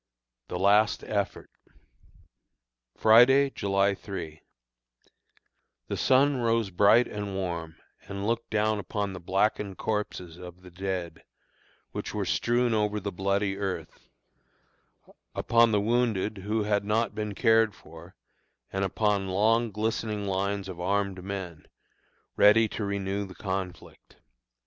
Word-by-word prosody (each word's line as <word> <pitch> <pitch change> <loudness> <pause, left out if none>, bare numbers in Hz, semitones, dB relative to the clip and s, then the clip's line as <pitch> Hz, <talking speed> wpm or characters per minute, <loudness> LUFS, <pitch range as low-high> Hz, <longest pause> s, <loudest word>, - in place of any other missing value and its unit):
THE 90 - -4
LAST 105 +3 +3
EFFORT. - - -3 1.5
Friday, 130 +5 +6
July 100 -2 +1
3. 90 -6 -7 1.5
The - - -1
sun 135 +2 +3
rose 115 -4 0
bright 105 +6 +5
and 105 -2 -5
warm, 85 -4 -4 0.3
and 100 0 -5
looked 115 +1 -1
down 110 0 +1
upon 100 0 -3
the 90 - -7
blackened 95 +2 0
corpses 95 -6 -4
of 90 0 -11
the 90 - -13
dead, 90 -1 -4 0.7
which - - -5
were - - -1
strewn 120 0 +1
over 105 -1 0
the 100 0 -4
bloody 100 +1 -1
earth; 95 -2 -5 1.3
upon 115 -1 +3
the 105 - +3
wounded 110 -2 0
who 105 +3 -1
had 105 -1 +1
not 110 +2 0
been 105 -1 -4
cared 110 0 +3
for, 80 +3 -14 0.6
and 95 0 -1
upon 100 0 0
long 110 +5 +2
glistening 105 0 -2
lines 100 +1 -2
of 90 -2 -8
armed 100 0 -1
men, 95 -5 -6 0.7
ready 110 +2 +6
to 110 - -4
renew 100 0 -2
the 95 - -12
conflict. 95 -3 -6
100 Hz, 125 wpm, -27 LUFS, 95-110 Hz, 1.5 s, Friday